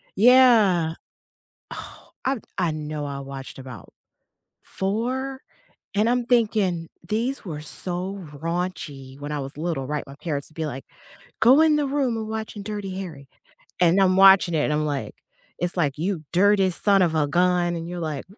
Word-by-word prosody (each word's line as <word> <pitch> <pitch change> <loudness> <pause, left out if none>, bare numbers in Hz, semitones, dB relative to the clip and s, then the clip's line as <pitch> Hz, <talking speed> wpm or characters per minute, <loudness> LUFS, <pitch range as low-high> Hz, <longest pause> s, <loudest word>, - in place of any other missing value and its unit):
Yeah. 215 -8 +5 0.8
Oh, - - -10
I 265 0 +1 0.2
I 175 -4 +1
know 150 -1 -4
I 140 -1 -5
watched 135 -1 -8
about 130 -2 -10 0.7
4, 255 +7 -2 0.5
and 215 +2 +3
I'm 245 0 +1
thinking 210 -8 +1 0.2
these 235 +6 -1
were 150 -4 -5
so 180 +3 -5
raunchy. 150 -4 -4
When 145 +1 -6
I 150 - -2
was 135 +1 -7
little, 155 -5 -2
right, 150 0 -2
my 140 - -10
parents 150 -2 -4
would - - -23
be 160 -1 -2
like, 135 -1 -7 0.6
"Go 255 +7 +7
in 315 -1 +5
the 290 -2 0
room, 270 -4 0
we're 220 - -3
watching 220 -1 -5
Dirty 205 -2 -5
Harry." 150 -8 -8 0.5
And 180 +3 +5
I'm 185 -1 +4
watching 190 -3 +7
it, 150 - +2
and 150 - 0
I'm 150 0 0
like 145 -2 -3 0.5
it's 175 0 -1
like, 145 -4 0
"You 170 -1 -2
dirty 195 +1 +4
son 195 +2 +3
of 160 -2 +1
a 150 -2 +2
gun," 175 +2 +2
and 165 0 -5
you're 175 0 -5
like, 155 -4 -3
175 Hz, 170 wpm, -24 LUFS, 150-210 Hz, 0.8 s, Go